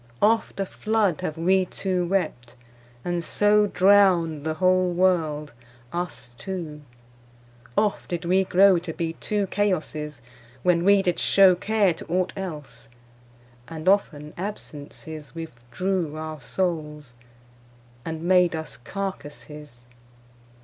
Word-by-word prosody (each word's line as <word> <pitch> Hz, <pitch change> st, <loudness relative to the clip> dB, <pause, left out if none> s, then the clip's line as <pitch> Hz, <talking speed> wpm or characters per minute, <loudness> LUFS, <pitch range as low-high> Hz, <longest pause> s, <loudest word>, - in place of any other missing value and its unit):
Oft 220 Hz, -1 st, +2 dB
a 195 Hz, -, 0 dB
flood 210 Hz, -4 st, 0 dB
Have 160 Hz, -3 st, -3 dB
wee 185 Hz, +3 st, +3 dB
two 180 Hz, -1 st, -2 dB
wept, 150 Hz, -11 st, -2 dB, 0.5 s
and 175 Hz, -1 st, -1 dB
so 210 Hz, +3 st, +3 dB
Drownd 185 Hz, -6 st, +4 dB
the 160 Hz, 0 st, -2 dB
whole 185 Hz, +1 st, +3 dB
world, 165 Hz, -5 st, +1 dB, 0.4 s
us 175 Hz, -8 st, -5 dB
two; 170 Hz, -6 st, -6 dB, 1.0 s
oft 210 Hz, -1 st, 0 dB
did 175 Hz, 0 st, -3 dB
we 185 Hz, +2 st, +3 dB
grow 190 Hz, 0 st, +5 dB
To 170 Hz, -1 st, -6 dB
be 165 Hz, 0 st, -3 dB
two 205 Hz, +3 st, -2 dB
Chaosses, 155 Hz, -8 st, -2 dB, 0.4 s
when 175 Hz, -1 st, +3 dB
we 200 Hz, +1 st, +5 dB
did 180 Hz, -2 st, 0 dB
show 195 Hz, -2 st, +6 dB
Care 200 Hz, 0 st, +1 dB
to -, -, -10 dB
ought 180 Hz, +2 st, 0 dB
else; 150 Hz, -12 st, -7 dB, 0.8 s
and 160 Hz, +1 st, -8 dB
often 155 Hz, -7 st, +1 dB
absences 155 Hz, -6 st, -8 dB
Withdrew 165 Hz, +4 st, -3 dB
our 155 Hz, -2 st, -6 dB
soules, 150 Hz, -5 st, -3 dB, 0.9 s
and 160 Hz, +1 st, -5 dB
made 180 Hz, -1 st, +4 dB
us 160 Hz, 0 st, -7 dB
carcasses. 150 Hz, -5 st, -7 dB
175 Hz, 120 wpm, -24 LUFS, 155-190 Hz, 1.0 s, show